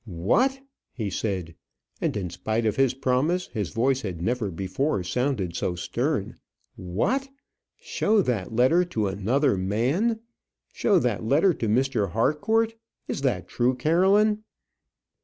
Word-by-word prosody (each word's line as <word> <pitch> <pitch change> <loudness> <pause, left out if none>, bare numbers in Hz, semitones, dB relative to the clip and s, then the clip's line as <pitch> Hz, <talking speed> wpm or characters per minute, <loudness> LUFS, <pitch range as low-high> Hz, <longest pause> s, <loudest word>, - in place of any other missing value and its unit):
"What!" 120 - +1 0.3
he 110 -5 -3
said, 95 -5 -3 0.5
and - - 0
in 90 -4 -4
spite 110 +6 -2
of 110 - +1
his 135 -2 +2
promise, 135 +7 +1
his 105 -7 -3
voice 130 +3 +1
had 95 -7 -5
never 115 +3 -1
before 95 - -1
sounded 100 -3 -1
so 90 - -1
stern, 85 - -2 0.4
"what! 180 - -1 0.5
show 210 -1 +1
that 115 - -2
letter 130 +10 +4
to 115 -12 -2
another 105 +8 +1
man; 130 - 0 0.5
show 205 -4 +3
that 120 - 0
letter 155 - +3
to 115 - -3
Mr. 120 -2 +1
Harcourt! 220 - +1 0.3
Is - - -3
that 135 -3 -1
true, 125 +1 +1
Caroline?" 190 +10 +3
125 Hz, 135 wpm, -25 LUFS, 100-160 Hz, 0.5 s, letter